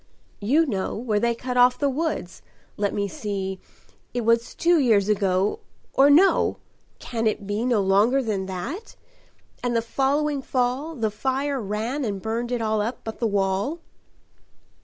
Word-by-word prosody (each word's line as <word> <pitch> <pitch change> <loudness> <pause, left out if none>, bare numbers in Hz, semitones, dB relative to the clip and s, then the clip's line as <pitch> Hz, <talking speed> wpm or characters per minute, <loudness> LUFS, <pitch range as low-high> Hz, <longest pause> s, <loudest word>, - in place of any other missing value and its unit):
"You 280 +11 +3
know 200 -9 -2
where 215 -2 0
they 235 +1 +1
cut 250 +1 -4
off 250 0 +5
the 285 - +1
woods 280 - -3 0.3
let 205 -1 0
me 200 0 -1
see 195 -1 -4 0.6
It 245 - 0
was 230 +1 +2
two 340 0 +3
years 220 -7 +3
ago 195 -1 +1 0.3
or 275 +1 +6
no! 345 +7 +4 0.4
can 225 -2 -2
it 210 -1 -1
be 205 +3 -2
No 240 -5 +2
longer 205 +8 +3
than 200 -5 -2
that? 230 - -6 0.7
and 245 -1 -1
the 230 - +3
following 280 +4 0
fall 260 +5 -1
The 220 -5 -1
fire 265 +5 -1
ran 220 +7 -2
and 205 -5 -2
burned 230 +4 -3
it 240 -2 -1
all 215 -1 +1
up 230 +4 -4
but 220 - -6
the 230 - +1
wall." 200 - 0
230 Hz, 160 wpm, -24 LUFS, 205-270 Hz, 0.7 s, or